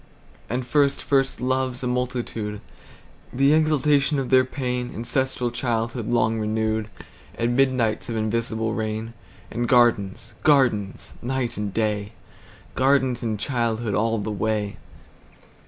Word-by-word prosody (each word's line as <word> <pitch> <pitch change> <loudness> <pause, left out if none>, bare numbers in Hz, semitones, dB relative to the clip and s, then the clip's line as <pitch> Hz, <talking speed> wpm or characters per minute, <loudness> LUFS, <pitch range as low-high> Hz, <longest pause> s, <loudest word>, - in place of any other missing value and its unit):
And 125 +3 -2
first 140 +2 +2
first 135 -1 +1
loves, 130 0 -1
a - - 0
multitude, 120 -4 -2 0.7
The 135 +3 +3
exaltation 150 -2 +3
of 135 -2 -2
their 130 0 +6
pain; 125 -2 -3
Ancestral 125 +1 0
childhood 115 -2 -2
long 115 -2 +2
renewed; 110 0 -1 0.5
And 120 +1 0
midnights 130 -5 +1
of 115 - -2
invisible 110 0 -1
rain; 110 0 -3 0.4
And 120 0 -2
gardens, 115 -4 +2
gardens, 120 -10 +2
night 125 -1 -2
and 105 -1 -3
day, 105 -1 -1 0.6
Gardens 130 -2 +2
and 110 -4 -2
childhood 115 -3 -1
all 115 +2 +1
the 105 +1 -3
way. 105 0 -1
120 Hz, 120 wpm, -24 LUFS, 110-130 Hz, 0.7 s, their